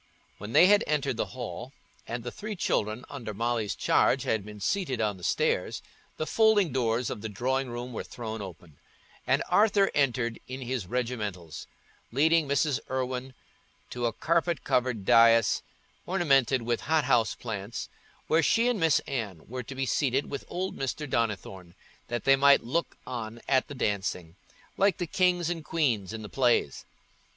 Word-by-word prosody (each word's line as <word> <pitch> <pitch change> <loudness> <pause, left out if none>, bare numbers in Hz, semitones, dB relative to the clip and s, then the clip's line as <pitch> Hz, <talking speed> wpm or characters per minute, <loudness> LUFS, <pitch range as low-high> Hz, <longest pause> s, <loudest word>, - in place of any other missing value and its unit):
When 105 +3 -7
they - - +8
had 205 +2 +5
entered 140 -4 0
the - - -1
hall, 125 +1 -6 0.3
and 120 0 -4
the 120 - -5
three 215 0 -6
children 110 - -1
under 120 -7 -7
Molly's 115 -1 -1
charge 135 0 +2
had 110 -6 0
been 105 0 -10
seated 150 - -1
on 105 -3 0
the 90 - -15
stairs, - - 0 0.3
the 155 - -2
folding 215 -4 +3
doors 120 -1 0
of - - -5
the 110 - -4
drawing 130 +5 -1
room 120 +1 -6
were - - -4
thrown 110 -2 -6
open, 85 -5 -11 0.5
and - - +2
Arthur 205 -2 +4
entered 125 -5 0
in 130 +1 -6
his 125 -6 -3
regimentals, 105 -9 -4 0.4
leading 155 +4 +3
Mrs. 140 0 +1
Irwine 130 0 -3 0.6
to 120 -1 -1
a - - -1
carpet 170 +5 0
covered 125 -5 0
dais 115 -1 +5 0.5
ornamented 135 -9 +2
with 120 0 -1
hot 155 +1 +1
house 120 -5 +2
plants, 105 -1 -5 0.4
where 160 +1 +3
she 230 +9 +3
and 240 -4 0
Miss 165 -3 +3
Anne 105 - -5
were 125 +2 -5
to 130 +3 -9
be 135 0 -1
seated 135 +2 0
with 140 - -5
old 185 +2 -3
Mr. 135 +3 -3
Donnithorne, 95 -7 -3 0.3
that 120 -2 -3
they 135 - +6
might 140 +1 +5
look 165 +8 -2
on 115 -2 -6
at 130 -1 +2
the 145 - -8
dancing, 95 -7 -2 0.4
like 195 -3 +3
the 175 - -2
kings 175 0 +1
and 165 -2 -4
queens 125 - 0
in 110 -1 -6
the - - -6
plays. 120 - +1
125 Hz, 170 wpm, -28 LUFS, 110-145 Hz, 0.6 s, they